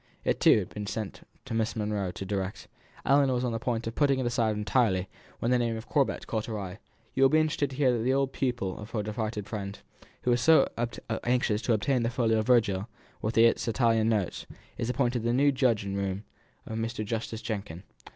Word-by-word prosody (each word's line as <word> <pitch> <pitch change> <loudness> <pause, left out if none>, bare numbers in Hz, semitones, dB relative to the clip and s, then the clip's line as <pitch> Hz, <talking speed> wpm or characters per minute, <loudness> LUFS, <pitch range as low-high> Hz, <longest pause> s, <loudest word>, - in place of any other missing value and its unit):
It, - - 0
too, - - +6
had - - -2
been 105 -1 -6
sent 110 -2 -4 0.2
to - - -5
Miss 115 0 0
Monro 105 -3 -1
to 90 +2 -7
direct. 95 -1 -3 0.4
Ellinor 135 -2 +4
was 125 - -1
on 125 - 0
the 115 - -2
point 120 -1 -2
of 115 - -3
putting 140 -1 +2
it 130 - -1
aside 115 -2 +1
entirely, 105 -3 +1 0.3
when 120 - -1
the 125 - +4
name 115 -1 0
of 110 - -9
Corbet 140 -3 +1
caught 110 -2 -2
her 110 -2 -3
eye: 95 +1 -6 0.3
"You 135 - -1
will 135 - +7
be 155 +3 +4
interested 150 -3 +1
to 135 - -8
hear 130 -3 +3
that 115 - -1
the 130 - +2
old 135 0 +1
pupil 120 -8 -2
of 105 +3 -8
our 105 - 0
departed 105 -1 -3
friend, 100 -1 -5 0.5
who 125 - +2
was 120 0 +2
so 160 +2 +6 0.6
anxious 120 -3 +1
to 120 - +1
obtain 125 +4 +1
the 115 - +1
folio 115 -3 +2
Virgil 110 -4 +2 0.3
with 110 +2 -2
the 115 - +7
Italian 115 -1 +2
notes, 105 -5 -1 0.3
is 120 0 -3
appointed 125 -2 +1
the 120 +1 0
new 140 +3 +4
judge 125 -7 +1
in 100 0 -3
room 100 0 -2 0.4
of 110 0 -4
Mr. 115 -1 -3
Justice 110 +1 -4
Jenkin. 100 -6 -5
115 Hz, 220 wpm, -28 LUFS, 105-125 Hz, 0.6 s, will